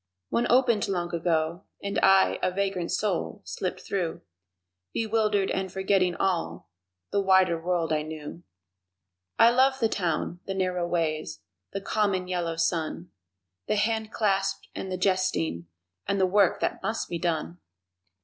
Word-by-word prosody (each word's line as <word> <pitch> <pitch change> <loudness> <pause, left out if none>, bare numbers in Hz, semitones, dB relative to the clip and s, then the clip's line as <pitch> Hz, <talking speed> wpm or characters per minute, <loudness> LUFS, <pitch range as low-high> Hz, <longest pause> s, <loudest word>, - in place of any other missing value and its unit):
One 240 - +1
opened 240 -4 +4
long 175 -2 -2
ago, 165 +1 0 0.2
and 200 0 -1
I 190 0 +5
A - - +2
vagrant 190 -2 -2
soul, 200 -1 -1
slipped 185 - -4
through, 180 -5 -3 0.7
Bewildered 215 -3 +1
and 190 -1 -2
forgetting 190 -2 +1
all 90 - -2 0.4
The 200 - +2
wider 190 -3 +4
world 170 -2 0
I 155 - +1
knew. 155 +1 -7 1.0
I 230 - +7
love 265 +2 +3
the 230 - +3
Town, 175 -3 -2
the 195 - -2
narrow 180 -2 0
ways, 155 - -2 0.3
The 195 - -3
common, 195 -3 0
yellow 175 -2 -2
sun, 165 +1 -1 0.6
The - - +1
handclasp 215 -2 0
and 190 - -5
the 185 - -2
jesting 85 - 0 0.4
and 200 - 0
The 190 - +4
work 200 +2 +3
that - - -1
must 225 - -2
be 170 - -4
done! 170 +1 -2
185 Hz, 140 wpm, -27 LUFS, 170-200 Hz, 1.0 s, I